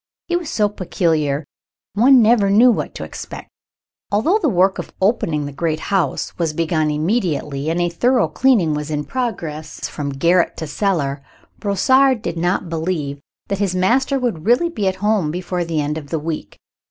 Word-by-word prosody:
He 350 - 0
was 345 -3 -2
so 210 -1 +2
peculiar 160 -7 -1 0.5
one 250 +3 +6
never 215 -3 +4
knew 230 +5 +6
what - - -3
to - - -5
expect. - - -8 0.6
Although 275 - +2
the 315 - +1
work 190 -2 +2
of - - -6
opening 170 -7 +1
the 145 - -5
great 155 +2 -2
house 190 -3 0
was 165 -3 0
begun 155 -1 0
immediately, 150 - -1
and 165 +2 0
a 175 - +2
thorough 240 +9 +2
cleaning 220 -13 +2
was 150 0 -4
in 150 -1 -2
progress 165 - -4
from 145 -1 -5
garret 170 +6 +2
to 160 - -4
cellar, 150 -4 -1 0.4
Brossard 255 +5 +3
did - - -3
not 175 +2 0
believe 160 -4 -3 0.3
that 200 - -2
his 195 -3 0
master 255 +9 +2
would 225 -10 -2
really 250 +9 +3
be 210 - -2
at 190 - 0
home 210 -7 +2
before 180 +2 -3
the 165 -2 -2
end 150 +1 -1
of 145 -2 -13
the 165 - -1
week. 155 -9 -5
180 Hz, 180 wpm, -19 LUFS, 155-220 Hz, 0.6 s, one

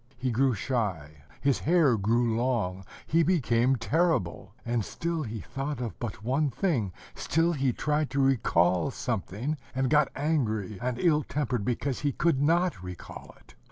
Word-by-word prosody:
He 130 0 -1
grew 130 +1 +2
shy, 90 - -3 0.2
his 140 -2 +2
hair 160 -6 +4
grew 115 +3 +1
long, 110 -6 -1 0.2
he 165 +2 +3
became 135 -7 +2
terrible; 115 - 0
and 120 -2 0
still 170 - -3
he 115 -6 -5
thought 140 +1 -4
of 120 -3 -5
but 110 -4 -5
one 140 +5 +1
thing, 130 - 0 0.2
still 165 +2 +1
he 135 -4 +1
tried 150 +3 0
to 140 - -2
recall 90 -8 +3
something, 125 - -3 0.2
and 130 0 0
got 150 -1 +4
angry 110 - -1
and 125 -1 -2
ill 150 +1 +3
tempered 130 -7 -2
because 125 +3 -1
he 145 -2 0
could 155 -4 +1
not 165 - +2
recall 90 -1 -9
it. - - -20
130 Hz, 160 wpm, -28 LUFS, 110-150 Hz, 0.2 s, hair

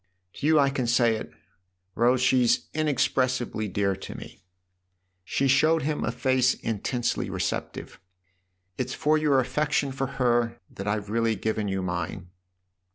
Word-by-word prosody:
" 90 0 -50
To 145 - -1
you 160 0 +5
I 140 -1 +3
can 130 -3 -2
say 120 -1 +3
it, 110 - -7 0.6
Rose 125 +2 +2
she's 125 -2 +3
inex 155 -2 +1
pressibly 125 -5 -1
dear 100 0 0
to - - -8
me." - - -11 0.8
She 135 +9 0
showed 155 +4 +3
him 150 +1 -1
a - - 0
face 130 +1 +2
intensely 115 +3 -2
receptive. - - -4 0.4
" 90 0 -48
It's 130 - -2
for 155 0 +2
your 145 -3 +3
affection 140 +2 0
for 135 0 -2
her 120 -2 +1
that 100 - -7
I've 105 0 -2
really 115 0 +1
given 110 +1 -2
you 95 -1 -2
mine." 90 0 -4
120 Hz, 160 wpm, -26 LUFS, 105-135 Hz, 0.8 s, you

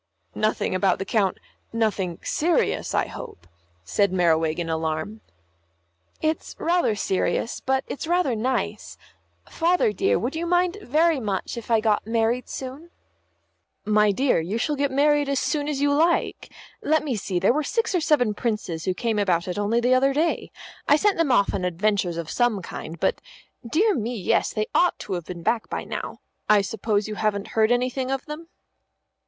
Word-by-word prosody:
"Nothing 215 -2 0
about 185 0 +2
the 195 - -4
Coun 200 -3 +1 0.4
nothing 205 -6 -1
serious, 330 +1 0
I - - +2
hope," 85 - -9 0.4
said 200 - +1
Merriwig, 165 -3 +2
in 170 -1 -2
alarm. 160 +6 -3 1.0
"It's 315 0 -1
rather 340 -9 +1
serious, 200 +3 -1
but 265 +1 0
it's 300 - -6
rather 345 -8 +2
nice. 250 +4 -2 0.5
Father, 340 -9 +1
dear, - - +2
would 245 +7 -3
you 335 +2 -2
mind 355 +3 +1
very 315 0 +2
much 205 -3 -3
if 235 -1 -8
I 225 -2 +3
got 215 -1 +1
married 230 +2 0
soon?" 270 +6 -7 1.0
"My 210 -1 +4
dear, 255 +3 +2
you 180 +7 -2
shall 295 +6 0
get 280 0 0
married 290 +1 +2
as 280 -2 +1
soon 295 -1 -1
as 285 -2 -2
you 285 0 +3
like. 330 +3 +1 0.3
Let 310 +1 +2
me 275 -5 -1
see, 195 -3 -3
there 190 +6 +3
were 305 - +1
six 455 - -1
or 360 - +2
seven 250 -9 +2
Princes 205 -8 -3
who 185 - 0
came 225 -1 -1
about 180 -4 +1
it 180 +2 -3
only 210 +3 +1
the 245 +2 +3
other 270 +1 +3
day. 325 +3 0 0.4
I 290 - +6
sent 400 +6 +2
them 320 -5 +2
off 200 -5 +3
on 185 - -2
adventures 180 0 0
of 165 -2 -5
some 240 -6 +1
kind, 165 -1 -7
but - - 0 0.5
dear 405 - +3
me, 240 - -2
yes, 190 -6 +1
they 215 -1 -1
ought 355 - +3
to 200 - -6
have 175 -3 -3
been 175 -1 -8
back 230 +4 0
by - - -3
now. - - -6 0.3
I 210 -1 +5
suppose 210 0 -1
you 215 - -4
haven't 210 -1 -1
heard 220 +1 +2
anything 255 +1 0
of 270 0 -2
them?" 315 +2 -8
230 Hz, 180 wpm, -24 LUFS, 200-290 Hz, 1.0 s, I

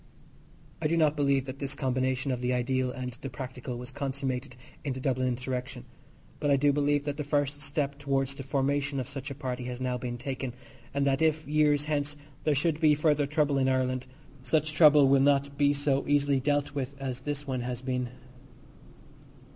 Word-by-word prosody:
I 155 - +2
do 165 +2 +1
not 155 -2 +3
believe 140 -2 +2
that 135 0 -7
this 140 -1 -2
combination 130 0 0
of 125 -1 -2
the 125 0 +1
ideal 130 +1 0
and 125 0 -5
the 135 - -4
practical 125 -1 -6
was 125 +2 -7
consummated 135 -1 -3 0.3
in 140 -2 -1
the 130 - -6
Dublin 130 -1 0
insurrection, 125 0 -3 0.5
but 145 - 0
I 140 - +5
do 145 +1 +3
believe 145 0 +2
that 145 -1 -3
the 150 - -2
first 145 0 0
step 140 0 -2
towards 135 -1 0
the 135 - -8
formation 140 +1 0
of 125 - -3
such 140 0 -5
a 140 - -6
party 125 -3 -4
has 125 0 -5
now 125 -1 -1
been 120 -1 -4
taken, 130 0 -4 0.4
and 140 +1 0
that 135 +1 +2
if, 155 -2 +2
years 150 -1 +3
hence, 150 -1 -1 0.3
there 150 -2 +3
should 155 +2 +1
be 155 -2 +5
further 150 -1 +2
trouble 145 -1 +2
in 130 0 +3
Ireland 130 -1 0 0.3
such 150 +4 +1
trouble 150 -3 +7
will 135 0 +5
not 140 0 +3
be 145 0 +4
so 140 -1 0
easily 145 -1 +3
dealt 145 +1 0
with 140 -1 -3
as 130 -2 -4
this 145 -1 -3
one 130 -3 -2
has 125 0 -4
been. 125 -1 -1
140 Hz, 195 wpm, -29 LUFS, 130-145 Hz, 0.5 s, trouble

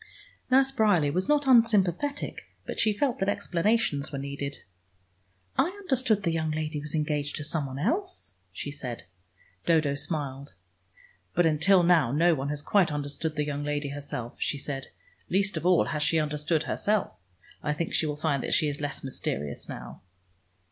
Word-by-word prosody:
Nurse 265 +1 +5
Bryerley 205 - +3
was 185 - 0
not 295 -1 +3
unsympathetic, 230 - +2 0.2
but - - -5
she 215 - +4
felt 245 +4 0
that 195 +1 +1
explanations 175 -6 +1
were 140 - -4
needed. 140 +1 -5 1.0
"I - - +6
understood 265 - +1
the 170 - +1
young 160 -1 -1
lady 155 -1 -2
was 150 +1 -5
engaged 150 -2 -1
to 150 - -4
some 150 -2 -1
one 130 0 -7
else," 360 - -1 0.2
she 145 +10 -5
said. 125 -5 -5 0.6
Dodo 155 -4 +3
smiled. 140 -2 -2 0.8
"But 175 - +4
until 175 +4 +4
now 165 -8 +4
no 165 +5 +4
one 140 -2 -2
has 145 0 -2
quite 190 -3 +3
understood 145 +2 -3
the 150 -1 0
young 145 0 -3
lady 145 -1 -2
herself," 140 -4 -5
she 145 - 0
said. 135 -1 -5 0.4
"Least 195 0 +1
of 160 +2 -1
all, 180 -2 +5
has 150 - -2
she 155 +2 +2
understood 150 +1 0
herself. 210 -1 0 0.5
I 150 - -1
think 165 +1 -3
she 160 - +2
will 150 -1 -3
find 150 -3 0
that - - 0
she 155 - +3
is 145 0 -5
less 145 -1 -4
mysterious 75 - -3
now." - - -8
155 Hz, 170 wpm, -28 LUFS, 145-195 Hz, 1.0 s, I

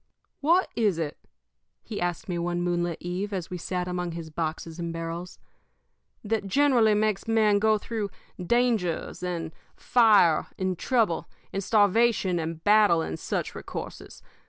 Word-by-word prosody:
"What 340 +6 +3
is 210 -7 +2
it," 155 -3 -4 0.6
he 215 - -6
asked 175 -1 -2
me 175 -2 -2
one 175 0 -1
moonlit 175 -1 -1
eve, 180 +4 -4
as 185 -4 -4
we 180 - -4
sat 180 +1 -3
among 180 -1 -3
his 165 -1 -7
boxes 160 +1 -4
and 170 -1 -3
barrels, 165 +2 -5 0.9
"that 215 -1 -1
generally 240 -2 +4
makes 215 0 0
men 215 -2 +3
go 215 +1 +3
through 210 -1 -4 0.3
dangers, 220 -7 0
and 170 -3 -3 0.2
fire, 210 -9 +4
and 185 -1 -1
trouble, 220 -4 0 0.2
and 195 - -2
starvation, 205 -3 +3
and 160 0 -5
battle, 205 -6 +5
and 80 - -5
such - - -3
recourses? - - -8
185 Hz, 145 wpm, -26 LUFS, 170-215 Hz, 0.9 s, battle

